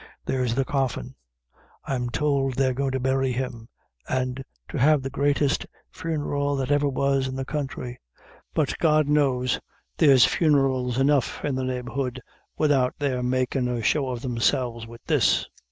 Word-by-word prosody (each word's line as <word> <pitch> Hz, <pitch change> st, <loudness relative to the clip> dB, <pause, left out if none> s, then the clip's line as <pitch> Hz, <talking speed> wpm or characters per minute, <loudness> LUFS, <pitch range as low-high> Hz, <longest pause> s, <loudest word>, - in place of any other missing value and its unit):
There's 125 Hz, -3 st, 0 dB
the 135 Hz, 0 st, +1 dB
coffin. 135 Hz, -1 st, -2 dB, 0.7 s
I'm 125 Hz, -3 st, -2 dB
tould 135 Hz, -1 st, 0 dB
they're 130 Hz, -1 st, +2 dB
goin' 135 Hz, +2 st, -1 dB
to 130 Hz, -, 0 dB
bury 130 Hz, 0 st, +1 dB
him, 120 Hz, -2 st, -5 dB, 0.4 s
and 130 Hz, 0 st, -1 dB, 0.3 s
to -, -, -4 dB
have 145 Hz, +1 st, +4 dB
the 135 Hz, -, -4 dB
greatest 145 Hz, 0 st, +1 dB, 0.2 s
funeral 145 Hz, -3 st, -2 dB
that 135 Hz, 0 st, -2 dB
ever 145 Hz, 0 st, +3 dB
was 135 Hz, 0 st, +1 dB
in 130 Hz, -, -5 dB
the 135 Hz, 0 st, -3 dB
counthry; 130 Hz, -4 st, -4 dB, 0.6 s
but, -, -, +1 dB
God 155 Hz, -2 st, +3 dB
knows, 135 Hz, -4 st, +2 dB, 0.4 s
there's 135 Hz, -5 st, +7 dB
funerals 135 Hz, -6 st, +2 dB
enough 135 Hz, 0 st, +1 dB
in 145 Hz, -, 0 dB
the 130 Hz, 0 st, -2 dB
neighborhood 130 Hz, 0 st, -3 dB, 0.4 s
widout 135 Hz, -4 st, +2 dB
their 135 Hz, -4 st, -1 dB
making 130 Hz, +1 st, 0 dB
a 120 Hz, -2 st, -2 dB
show 135 Hz, +3 st, +1 dB
of 125 Hz, -1 st, -5 dB
themselves 120 Hz, -1 st, 0 dB
wid 115 Hz, 0 st, -12 dB
this." -, -, +2 dB
130 Hz, 155 wpm, -25 LUFS, 125-140 Hz, 0.7 s, there's